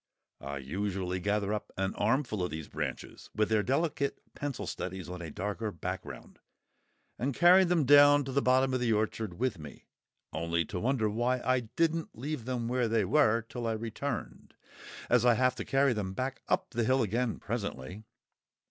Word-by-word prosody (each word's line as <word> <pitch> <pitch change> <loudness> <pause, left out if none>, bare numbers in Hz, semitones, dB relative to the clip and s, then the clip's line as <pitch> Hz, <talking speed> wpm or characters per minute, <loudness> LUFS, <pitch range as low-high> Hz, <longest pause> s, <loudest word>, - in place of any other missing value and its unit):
I 70 +1 -5
usually 90 +6 -3
gather 100 +2 0
up 105 - -4
an 95 0 -1
armful 115 -1 0
of 90 - -1
these 80 -1 -6
branches, - - -6
with 105 0 +1
their 110 -1 +3
delicate 140 +3 0
pencil 145 -2 -4
studies 95 -1 -5
on 90 0 -6
a 85 - -6
darker 105 +6 -3
background, 85 - -7 0.8
and 130 +3 -1
carry 180 +2 +7
them 170 -4 +2
down 145 +1 +7
to 135 - -4
the 140 +2 +2
bottom 130 +1 +3
of 130 - +1
the 120 -2 +1
orchard 110 -2 -1
with 125 -7 -1
me—only 85 +2 -5
to 90 - -5
wonder 120 0 +1
why 120 +4 0
I 130 +1 +3
didn't 160 +7 -1
leave 135 -1 -4
them 125 -2 -2
where 125 0 +1
they 110 -2 +1
were 115 -1 +3
till 120 0 -5
I 115 - 0
returned, 115 +3 -5 0.5
as - - +4
I 120 -1 +5
have 130 +1 +3
to - - -4
carry 135 -1 +3
them 100 -4 -3
back 130 +5 -3
up - - 0
the 120 -1 0
hill 130 +2 +3
again 115 +3 -1
presently! 100 - -5
115 Hz, 175 wpm, -30 LUFS, 100-130 Hz, 0.8 s, carry